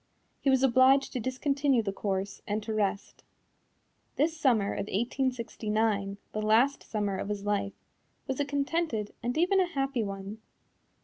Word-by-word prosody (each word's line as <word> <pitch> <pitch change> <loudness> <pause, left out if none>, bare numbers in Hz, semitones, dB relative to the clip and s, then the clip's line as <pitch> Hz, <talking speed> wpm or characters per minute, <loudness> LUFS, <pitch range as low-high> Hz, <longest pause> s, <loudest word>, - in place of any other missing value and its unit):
He 275 - +1
was 265 0 +3
obliged 265 +2 +5
to 255 - -2
discontinue 265 +1 +1
the 195 -2 -2
course 195 0 -3
and 210 +1 -1
to 220 - -3
rest. 200 -2 -2 0.9
This 320 +3 +1
summer 235 -10 +2
of 200 - -3
1869 220 -3 -1
the 215 - -3
last 230 +6 +3
summer 205 -3 -2
of 200 - -4
his 205 -1 -3
life 200 -1 0 0.5
was 265 0 -3
a 285 - +1
contented 280 -6 -1
and 245 +4 -2
even 365 +4 +3
a 370 - +3
happy 275 -6 -1
one. 200 +1 -6
230 Hz, 150 wpm, -29 LUFS, 205-275 Hz, 0.9 s, obliged